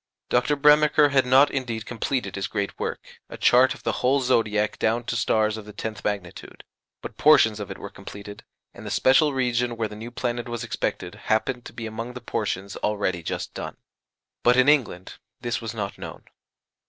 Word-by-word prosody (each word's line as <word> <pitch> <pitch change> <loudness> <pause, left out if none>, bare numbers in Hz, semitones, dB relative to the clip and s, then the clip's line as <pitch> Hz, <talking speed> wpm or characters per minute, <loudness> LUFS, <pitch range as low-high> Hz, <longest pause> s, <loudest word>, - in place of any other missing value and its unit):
Dr. 125 +4 +2
Bremiker 150 0 +5
had 135 -2 +3
not, 135 +3 +6
indeed, 120 -5 -3
completed 120 -3 -3
his 95 -1 -2
great 100 -2 -3
work - - -4 0.2
a - - -8
chart 130 +2 +4
of - - -17
the - - 0
whole 130 +3 +3
zodiac 110 -5 +1
down 115 +2 +1
to 120 - -3
stars 110 -1 +1
of 110 - -9
the 105 - -11
tenth 110 -1 -6
magnitude 100 -4 -5 0.4
but - - -8
portions 120 -8 +5
of 105 - -6
it - - -7
were - - -8
completed, 100 0 -10 0.3
and - - -12
the - - -6
special 145 +3 +4
region 125 -2 0
where 110 -1 -1
the 105 - -10
new 110 +3 -7
planet 120 0 -3
was 120 0 -4
expected 115 - -3 0.2
happened 120 +3 0
to - - -10
be 115 - -6
among 115 +2 -6
the - - -7
portions 100 +2 -3
already 100 -4 -1
just 80 - -5
done. - - -6 0.6
But 120 +1 +4
in 130 +1 +5
England 125 -12 +1 0.2
this 120 0 -2
was 115 -1 -6
not 100 -2 -4
known. - - -8
115 Hz, 190 wpm, -24 LUFS, 105-130 Hz, 0.6 s, not